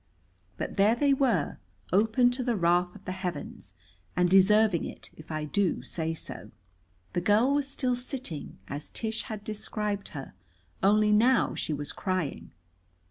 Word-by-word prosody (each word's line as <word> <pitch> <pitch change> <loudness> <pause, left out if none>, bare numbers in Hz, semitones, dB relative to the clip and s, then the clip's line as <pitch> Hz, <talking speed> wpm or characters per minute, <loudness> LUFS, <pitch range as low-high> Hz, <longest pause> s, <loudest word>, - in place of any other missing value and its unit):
But - - -4
there 205 +3 +5
they 280 +2 +3
were, 245 - +1 0.3
open 225 +5 +4
to 255 +1 -2
the 240 -1 0
wrath 180 0 +2
of 205 - -14
the 185 - -3
heavens, 175 - -6 0.4
and 180 0 +3
deserving 195 -1 +5
it, - - -8
if 155 +1 -12
I 155 -1 -2
do 195 +4 0
say 165 -1 -3
so. - - -8 0.6
The 175 - 0
girl 215 +8 +4
was 285 -1 +1
still 255 -2 0
sitting, 245 - -5
as 145 +1 -6
Tish 220 0 -2
had 215 -4 -6
described 210 -1 -3
her. 135 - -7 0.5
Only 210 +2 +4
now 235 +4 +4
she - - -3
was 145 -1 -2
crying. 185 -7 -3
205 Hz, 155 wpm, -28 LUFS, 175-230 Hz, 0.6 s, there